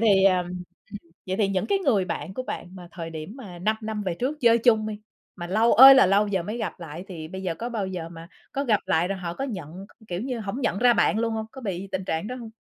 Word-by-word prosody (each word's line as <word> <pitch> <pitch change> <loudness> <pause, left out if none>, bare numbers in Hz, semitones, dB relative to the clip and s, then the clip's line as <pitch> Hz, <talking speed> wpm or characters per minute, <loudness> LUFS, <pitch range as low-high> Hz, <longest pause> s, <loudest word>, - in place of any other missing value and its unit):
thì, 200 -4 +4
à, 185 -2 +5
ừm, 180 0 -5 0.6
vậy 185 - -2
thì 200 -2 +2
những 190 -2 -1
cái 400 -1 +1
người 230 - +2
bạn 190 - -5
của 255 - -3
bạn 175 - -6
mà 175 -1 -11
thời 165 -2 -6
điểm 160 +7 -7
mà 195 -10 -10
5 215 +4 0
năm 215 -1 -4
về 180 -3 -2
trước 275 - -3
chơi 235 -1 +5
chung 220 -2 +3
đi, 210 -1 -6 0.4
mà 175 -2 -6
lâu 220 +6 +3
ơi 270 +2 +11
là 260 -7 +6
lâu 200 +2 +3
giờ 190 -3 0
mới 215 +6 -5
gặp 190 - -4
lại 165 +2 -8
thì 160 -4 -7
bây 190 +1 -7
giờ 175 -3 -2
có 235 +5 -5
bao 220 -5 -3
giờ 180 -3 -5
mà 165 0 -11 0.2
có 275 - -2
gặp 220 -6 +2
lại 170 +3 +2
rồi 195 -1 -3
họ 170 -1 -5
có 270 - -3
nhận, 185 - -7 0.2
k - - -26
kiểu 175 +1 -3
như, 245 -2 -3
hổng 215 +6 -4
nhận 215 -5 0
ra 245 0 +5
bạn 220 - +2
luôn 230 0 0
hông? 220 0 -3
Có 265 - -10
bị 195 -3 -4
tình 190 0 -2
trạng 160 +4 -2
đó 250 - -5
hông? 235 -3 -9
195 Hz, 285 wpm, -25 LUFS, 180-230 Hz, 0.6 s, ơi